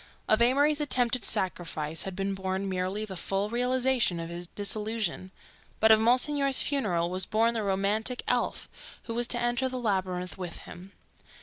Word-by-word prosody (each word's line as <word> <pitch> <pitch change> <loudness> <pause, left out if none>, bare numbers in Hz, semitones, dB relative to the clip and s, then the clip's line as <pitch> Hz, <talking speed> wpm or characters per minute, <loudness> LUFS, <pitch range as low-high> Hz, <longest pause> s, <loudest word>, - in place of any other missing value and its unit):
Of 215 +2 +3
Amory's 285 +5 +3
attempted 250 -4 +1
sacrifice 165 -5 -1
had 185 - -10
been 195 +1 -2
born 190 0 -3
merely 190 +3 -2
the 195 -3 -8
full 195 +3 -2
realization 250 -5 +1
of 165 0 -6
his 175 +1 -7
disillusion, 210 -2 -2 0.5
but 220 0 +5
of 220 - +7
Monsignor's 265 +4 +4
funeral 180 -12 -1
was 185 0 -1
born 230 +2 +2
the 225 - -2
romantic 205 +5 0
elf - - -1 0.4
who 230 - -6
was 240 +1 0
to 240 - +3
enter 240 +2 0
the 255 - -5
labyrinth 185 -6 -2
with 180 -2 -6
him. 185 +2 -12
215 Hz, 165 wpm, -28 LUFS, 185-245 Hz, 0.5 s, of